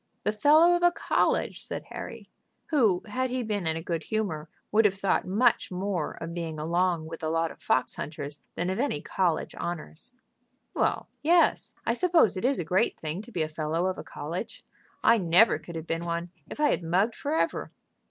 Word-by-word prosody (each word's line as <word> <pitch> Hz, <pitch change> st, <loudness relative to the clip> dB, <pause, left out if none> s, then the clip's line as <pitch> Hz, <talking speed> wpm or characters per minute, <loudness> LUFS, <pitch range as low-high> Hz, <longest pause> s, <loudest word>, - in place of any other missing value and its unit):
"The -, -, +2 dB
fellow 310 Hz, +10 st, +5 dB
of 350 Hz, -, 0 dB
a 350 Hz, -, +6 dB
college!" -, -, 0 dB
said -, -, -5 dB
Harry, -, -, -7 dB, 0.5 s
who, 220 Hz, -, +3 dB
had 255 Hz, +5 st, -1 dB
he 250 Hz, 0 st, -1 dB
been 205 Hz, -5 st, -2 dB
in 160 Hz, 0 st, 0 dB
a 165 Hz, -, -6 dB
good 165 Hz, -2 st, -2 dB
humor, 185 Hz, -9 st, -3 dB, 0.2 s
would 220 Hz, +1 st, +5 dB
have 195 Hz, -2 st, +4 dB
thought 195 Hz, -1 st, 0 dB
much 225 Hz, +6 st, +2 dB
more 185 Hz, -3 st, -2 dB
of 165 Hz, 0 st, -7 dB
being 165 Hz, -2 st, -4 dB
along 170 Hz, +1 st, 0 dB
with 165 Hz, +1 st, -8 dB
a 160 Hz, -, -1 dB
lot 165 Hz, 0 st, 0 dB
of -, -, -15 dB
fox 130 Hz, -, +1 dB
hunters 145 Hz, -1 st, -6 dB
than 175 Hz, +2 st, -1 dB
of 190 Hz, -, -3 dB
any 275 Hz, -, 0 dB
college 175 Hz, -4 st, 0 dB
honors. 170 Hz, +4 st, -6 dB, 0.6 s
"Well, -, -, 0 dB
yes; 335 Hz, +3 st, +3 dB
I 230 Hz, -, +2 dB
suppose 340 Hz, -, +3 dB
it 185 Hz, -, -2 dB
is 275 Hz, +1 st, +3 dB
a 170 Hz, -, -2 dB
great 185 Hz, +8 st, +1 dB
thing 155 Hz, +4 st, -4 dB
to 240 Hz, -, -13 dB
be 170 Hz, -7 st, 0 dB
a -, -, -2 dB
fellow 155 Hz, +2 st, -2 dB
of 185 Hz, 0 st, -1 dB
a -, -, -6 dB
college. 165 Hz, +9 st, -6 dB, 0.4 s
I 230 Hz, -, +6 dB
never 180 Hz, +5 st, +5 dB
could 170 Hz, -, -10 dB
have 160 Hz, -1 st, -5 dB
been 165 Hz, 0 st, -2 dB
one 170 Hz, +1 st, -3 dB, 0.2 s
if -, -, -8 dB
I 300 Hz, -, +4 dB
had -, -, 0 dB
mugged 185 Hz, +7 st, +1 dB
forever." 300 Hz, +7 st, -1 dB
180 Hz, 200 wpm, -28 LUFS, 165-230 Hz, 0.6 s, a